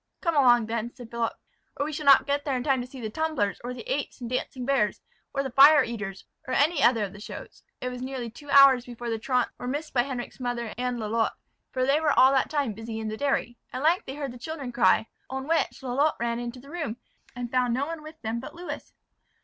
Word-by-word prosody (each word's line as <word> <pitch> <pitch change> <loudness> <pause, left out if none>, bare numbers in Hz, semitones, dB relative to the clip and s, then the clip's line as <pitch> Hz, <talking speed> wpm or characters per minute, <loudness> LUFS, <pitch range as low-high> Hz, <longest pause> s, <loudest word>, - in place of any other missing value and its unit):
"Come 335 -3 0
along 240 -5 +5
then," 230 +1 -3
said 245 -3 -11
Philip; 235 -1 -1 0.4
"or 285 - 0
we 305 - -4
shall 295 0 -4
not 275 - +8
get 285 0 0
there 275 -3 0
in 245 - -3
time 270 -3 +2
to 245 - -6
see 260 +1 -11
the 220 -3 -4
tumblers, 310 -9 -1
or 245 - -4
the 250 - -7
apes - - -2
and 245 - -5
dancing 250 +1 -3
bears, 245 -7 +1 0.3
or 275 0 -1
the 265 - -4
fire 280 +3 +8
eaters, 210 -5 -5 0.2
or 255 - -1
any 295 +2 +3
other 230 -3 +4
of 195 - -4
the 210 - -11
shows." 210 - -9 0.2
It 250 - -2
was 250 0 -7
nearly 255 -3 -4
two 290 +5 -13
hours 275 -3 +7
before 240 -1 -5
the 225 - -1
truants 250 0 +1
were 245 - -5
missed 290 +4 -3
by 245 - +4
Henric's 250 -1 -5
mother 240 -3 -3
and 250 0 -2
Lalotte; 225 0 0 0.3
for 255 -1 0
they 280 +4 +3
were 300 -3 +2
all 260 +1 +8
that 270 -1 +2
time 285 -6 0
busy 225 +1 -6
in 220 -1 -3
the 215 - -3
dairy. 255 -2 -1
At 255 - -4
length 335 +4 +2
they 265 - -5
heard 280 -3 -4
the 245 - -11
children 285 -2 -5
cry; 235 -2 +4 0.2
on 265 +1 -4
which, 325 -3 0
Lalotte 275 +4 +1
ran 235 0 -1
into 240 +1 -5
the 275 +3 -14
room, 310 -10 -3 0.4
and 245 -1 -5
found 250 -2 +2
no 270 +2 0
one 325 0 -5
with 310 +1 -11
them 225 +1 -2
but 260 - -9
Lewis. 350 +1 -7
255 Hz, 245 wpm, -27 LUFS, 235-280 Hz, 0.4 s, not